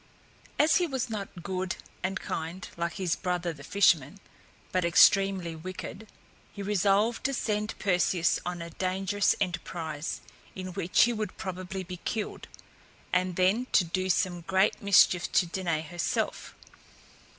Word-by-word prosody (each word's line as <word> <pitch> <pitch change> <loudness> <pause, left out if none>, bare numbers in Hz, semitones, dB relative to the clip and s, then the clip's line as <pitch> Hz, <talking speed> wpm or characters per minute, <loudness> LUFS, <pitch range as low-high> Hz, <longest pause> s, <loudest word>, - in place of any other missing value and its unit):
As 300 +2 +5
he 355 -2 +1
was 260 -5 -3
not 195 -5 -6
good 185 0 -2 0.3
and 190 +1 -2
kind, 165 +3 -5
like 170 -1 -2
his 180 -4 0
brother 180 -2 -2
the 140 -3 -12
fisherman, 180 -2 +3 0.5
but 185 -1 +1
extremely 185 0 +4
wicked, 185 +5 -7 0.4
he 200 - -7
resolved 205 +3 +2
to 275 -1 +1
send 210 -2 -2
Perseus 180 -2 +2
on 175 -1 -4
a 170 - -8
dangerous 190 +3 +1
enterprise, 165 -4 -3 0.3
in 185 -1 -5
which 185 -1 +3
he 240 - +2
would 215 -3 -4
probably 185 0 -5
be 180 0 -7
killed, 210 +4 -4 0.7
and 180 -1 +1
then 195 +8 +2
to 190 - +6
do 185 +2 -2
some 175 -1 +1
great 190 +4 +1
mischief 185 -3 +4
to 180 - +4
Danaë 170 -3 -2
herself. 175 -1 -2
185 Hz, 140 wpm, -28 LUFS, 175-200 Hz, 0.7 s, to